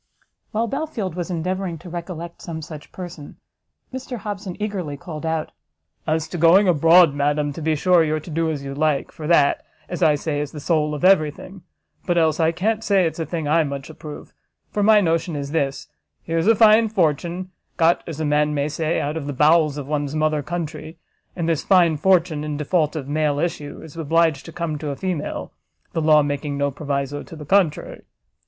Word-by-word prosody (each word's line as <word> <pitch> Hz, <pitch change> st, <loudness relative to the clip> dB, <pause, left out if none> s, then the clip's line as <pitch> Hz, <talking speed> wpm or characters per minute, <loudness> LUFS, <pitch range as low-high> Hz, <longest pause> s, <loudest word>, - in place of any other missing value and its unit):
While 225 Hz, +1 st, 0 dB
Belfield 230 Hz, -, -3 dB
was 175 Hz, +1 st, -4 dB
endeavouring 180 Hz, +1 st, -2 dB
to 175 Hz, -, -13 dB
recollect 170 Hz, -1 st, -7 dB
some 160 Hz, -2 st, -6 dB
such 150 Hz, -1 st, -10 dB
person, 175 Hz, -5 st, -9 dB, 0.6 s
Mr 260 Hz, -1 st, -5 dB
Hobson 200 Hz, -3 st, -6 dB
eagerly 190 Hz, -9 st, -3 dB
called 165 Hz, -2 st, -6 dB
out 160 Hz, -1 st, -2 dB, 0.6 s
"As 155 Hz, 0 st, 0 dB
to 175 Hz, -, -5 dB
going 180 Hz, +5 st, +6 dB
abroad, 165 Hz, -1 st, +6 dB
madam, 145 Hz, +1 st, 0 dB
to 165 Hz, -, -7 dB
be 155 Hz, 0 st, +1 dB
sure 175 Hz, +2 st, +4 dB
you're 155 Hz, 0 st, 0 dB
to 160 Hz, +2 st, -10 dB
do 165 Hz, +1 st, 0 dB
as 145 Hz, -3 st, -3 dB
you 135 Hz, 0 st, -5 dB
like, 150 Hz, 0 st, 0 dB
for 155 Hz, -, -7 dB
that, 150 Hz, -4 st, +3 dB, 0.2 s
as 175 Hz, 0 st, -5 dB
I 155 Hz, -3 st, +5 dB
say, 145 Hz, 0 st, -2 dB
is 145 Hz, -1 st, -4 dB
the 150 Hz, -, -6 dB
soul 150 Hz, -1 st, 0 dB
of 150 Hz, -, -2 dB
every 185 Hz, -6 st, +5 dB
thing; 185 Hz, +6 st, -11 dB, 0.5 s
but 175 Hz, -1 st, +1 dB
else 160 Hz, -1 st, +2 dB
I 160 Hz, 0 st, +3 dB
can't 215 Hz, +6 st, -1 dB
say 195 Hz, -4 st, +3 dB
it's 165 Hz, -, -3 dB
a 160 Hz, -, -2 dB
thing 165 Hz, -4 st, -3 dB
I 160 Hz, +2 st, +3 dB
much 140 Hz, 0 st, -5 dB
approve; 150 Hz, -1 st, -10 dB, 0.4 s
for 210 Hz, -, -1 dB
my 210 Hz, 0 st, +6 dB
notion 165 Hz, -2 st, 0 dB
is 140 Hz, -1 st, -4 dB
this: 140 Hz, -4 st, -1 dB, 0.4 s
here's 165 Hz, +2 st, -1 dB
a 225 Hz, -, +6 dB
fine 220 Hz, 0 st, +6 dB
fortune, 175 Hz, -1 st, -1 dB, 0.3 s
got 170 Hz, +1 st, +3 dB
as 160 Hz, -3 st, -6 dB
a 155 Hz, -, -1 dB
man 150 Hz, 0 st, +2 dB
may 145 Hz, +1 st, 0 dB
say, 155 Hz, +1 st, -1 dB
out 150 Hz, +3 st, -2 dB
of 145 Hz, -3 st, -5 dB
the 145 Hz, -, -3 dB
bowels 150 Hz, +1 st, +4 dB
of 145 Hz, -, -5 dB
one's 145 Hz, 0 st, -2 dB
mother 155 Hz, -1 st, +1 dB
country, 160 Hz, 0 st, -5 dB, 0.4 s
and 170 Hz, -2 st, -2 dB
this 165 Hz, -3 st, 0 dB
fine 175 Hz, -4 st, +4 dB
fortune, 170 Hz, -2 st, +2 dB
in 150 Hz, -1 st, -3 dB
default 155 Hz, +1 st, 0 dB
of 140 Hz, -4 st, -4 dB
male 150 Hz, 0 st, 0 dB
issue, 150 Hz, -2 st, -3 dB
is 160 Hz, -1 st, -12 dB
obliged 165 Hz, -2 st, +1 dB
to 165 Hz, -, -9 dB
come 160 Hz, -3 st, -3 dB
to 150 Hz, -, -4 dB
a 140 Hz, -, -3 dB
female, 180 Hz, -2 st, -4 dB, 0.4 s
the 165 Hz, -, 0 dB
law 155 Hz, -1 st, +5 dB
making 145 Hz, 0 st, -3 dB
no 140 Hz, 0 st, 0 dB
proviso 140 Hz, 0 st, -3 dB
to 170 Hz, -, -11 dB
the 150 Hz, -1 st, -9 dB
contrary. 180 Hz, -2 st, +1 dB
160 Hz, 205 wpm, -22 LUFS, 150-175 Hz, 0.6 s, going